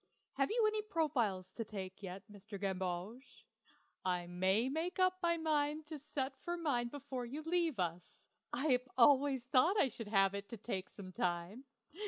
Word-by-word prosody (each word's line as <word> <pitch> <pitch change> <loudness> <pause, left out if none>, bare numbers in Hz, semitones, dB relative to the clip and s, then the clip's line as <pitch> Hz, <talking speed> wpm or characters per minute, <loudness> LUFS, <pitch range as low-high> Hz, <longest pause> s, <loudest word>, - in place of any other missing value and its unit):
Have 275 0 +1
you 455 0 +3
any 430 0 +2
profiles 255 - 0
to 230 - -3
take 195 -3 -7
yet, 190 0 -6
Mr. 205 -1 -9
Gamboge? 190 +5 -4 0.6
I 180 -1 0
may 190 +6 +2
make 320 +6 -2
up 370 0 +3
my 340 -1 +2
mind 305 -1 0
to 310 -2 -5
set 275 -2 -3
for 345 0 -2
mine 275 -8 0
before 265 -2 -5
you 290 +6 -5
leave 330 -3 +1
us; 175 -1 -2 0.4
I've 255 -1 +1
always 265 0 +5
thought 310 +11 +4
I 265 - +4
should 230 -1 -7
have 195 -2 +4
it 200 0 -4 0.2
taken 190 -5 -3
some 190 -2 -9
time. 180 +8 -2
250 Hz, 165 wpm, -36 LUFS, 195-305 Hz, 0.6 s, always